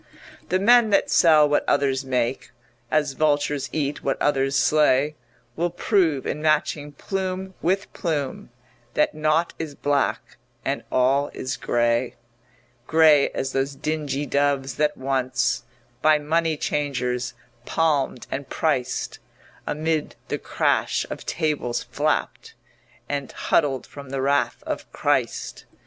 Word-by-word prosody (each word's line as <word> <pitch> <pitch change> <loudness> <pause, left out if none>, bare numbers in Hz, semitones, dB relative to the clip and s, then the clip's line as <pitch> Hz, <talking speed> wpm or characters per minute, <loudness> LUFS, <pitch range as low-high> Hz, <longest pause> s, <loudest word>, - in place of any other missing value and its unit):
The 185 - +3
men 235 +3 +5
that 200 - +2
sell 155 -3 +6
what 145 0 +2
others 135 -2 +2
make, 130 -1 -1 0.4
As 150 -2 +1
vultures 145 -1 +1
eat 145 -2 -2
what 135 - -1
others 135 -1 +1
slay, 150 0 +3 0.4
Will 175 +2 0
prove 175 -5 +1
in 150 - -3
matching 150 -1 0
plume 190 +1 -4
with 190 +4 0
plume 150 -6 -3 0.5
That - - +2
naught 155 +2 +1
is 155 -3 -5
black 145 0 -1 0.3
and - - -1
all 135 +3 +2
is 130 - -3
grey; 120 +1 0 0.7
Grey 155 -3 +5
as 135 - -3
those 135 +1 -1
dingy 150 -1 -2
doves 140 -2 0
that 150 0 +1
once, 130 -2 0 0.4
By 155 0 +5
money 160 +1 0
changers 125 -5 -2 0.3
palmed 145 -6 0
and 135 -1 -4
priced, 130 -5 -1 0.5
Amid 155 0 -1
the - - -2
crash - - 0
of - - -7
tables 150 -7 -1
flapped - - -2 0.5
And 140 -1 -3
huddled 135 -3 +1
from 140 -2 -11
the 135 0 -2
wrath 140 +1 +1
of - - -5
Christ. - - -1
145 Hz, 125 wpm, -24 LUFS, 135-155 Hz, 0.7 s, sell